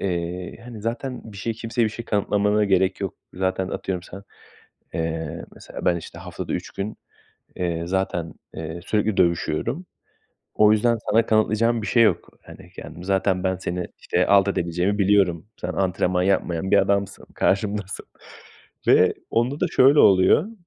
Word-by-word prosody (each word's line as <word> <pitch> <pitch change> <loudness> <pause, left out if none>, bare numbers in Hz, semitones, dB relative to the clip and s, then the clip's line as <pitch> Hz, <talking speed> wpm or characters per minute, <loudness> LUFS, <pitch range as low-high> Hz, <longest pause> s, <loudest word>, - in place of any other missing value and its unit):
eee, 90 -1 -3
hani, 115 -3 -9
zaten 120 0 -4
bir 100 - -11
şeyi 115 +3 -2
kimseye 115 +1 -1
bir - - +2
şey 120 +2 -7
kanıtlamana 105 0 +1
gerek 95 -1 +2
yok. 100 -2 -3 0.2
Zaten, 95 0 -1
atıyorum, 90 -2 -3
sen 95 +2 -10 0.7
Eee, 80 -1 -3
mesela - - -9
ben, 85 - +4
işte, 85 - -9
haftada - - -6
3 - - -5
gün, 100 +2 -5 0.6
eee, 85 -2 -2
zaten, 90 -3 -2 0.2
eee, 80 +2 -6
sürekli 105 -1 0
dövüşüyorum. 90 - 0 0.7
O 105 0 +5
yüzden 115 +2 +2
sana 115 +2 +3
kanıtlayacağım 110 +1 +2
bir 105 - -4
şey 115 +3 +4
yok. 110 - +2
Hani, - - -14
kendimi 85 - -9
Zaten 95 -1 +1
ben 95 0 +1
seni, 90 -1 -4
işte, 90 +1 0
alt 100 -1 +5
edebileceğimi 90 +3 0
biliyorum. 95 -4 +2
Sen - - -3
antrenman 90 -1 0
yapmayan 95 -1 0
bir - - +7
adamsın, 100 0 0
karşımdasın. 100 -1 -1 0.8
Ve - - +5 0.2
onda 125 +5 0
da - - +2
şöyle 140 +3 +5
oluyor 100 - +5
95 Hz, 155 wpm, -23 LUFS, 90-110 Hz, 0.8 s, bir